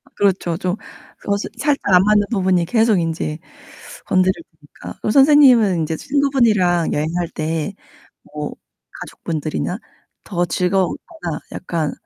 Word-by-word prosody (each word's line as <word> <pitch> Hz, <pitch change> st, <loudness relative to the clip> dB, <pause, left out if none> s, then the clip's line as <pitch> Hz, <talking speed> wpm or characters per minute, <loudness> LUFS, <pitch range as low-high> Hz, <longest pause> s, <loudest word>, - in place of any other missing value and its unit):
그렇죠. 185 Hz, -4 st, +1 dB
좀 185 Hz, 0 st, -2 dB, 0.5 s
어색 200 Hz, 0 st, -1 dB
살짝 275 Hz, -8 st, +1 dB
안 180 Hz, -, +6 dB
맞는 210 Hz, 0 st, +3 dB
부분이 185 Hz, -4 st, +2 dB
계속 220 Hz, -1 st, +2 dB
인제 160 Hz, -1 st, -3 dB, 0.7 s
건드려지니까. 170 Hz, -5 st, -2 dB
그럼 215 Hz, -, 0 dB
선생님은 265 Hz, -, +6 dB
인제 160 Hz, 0 st, -2 dB
친구분이랑 235 Hz, -, +2 dB
여행할 165 Hz, +3 st, -1 dB
때 160 Hz, +4 st, -3 dB, 0.6 s
뭐 -, -, -4 dB, 0.5 s
가족분들이나 165 Hz, +5 st, -4 dB, 0.4 s
더 175 Hz, -3 st, -1 dB
즐거웠거나 185 Hz, -, -2 dB
약간 165 Hz, -4 st, -2 dB
185 Hz, 280 characters per minute, -19 LUFS, 165-215 Hz, 0.7 s, 안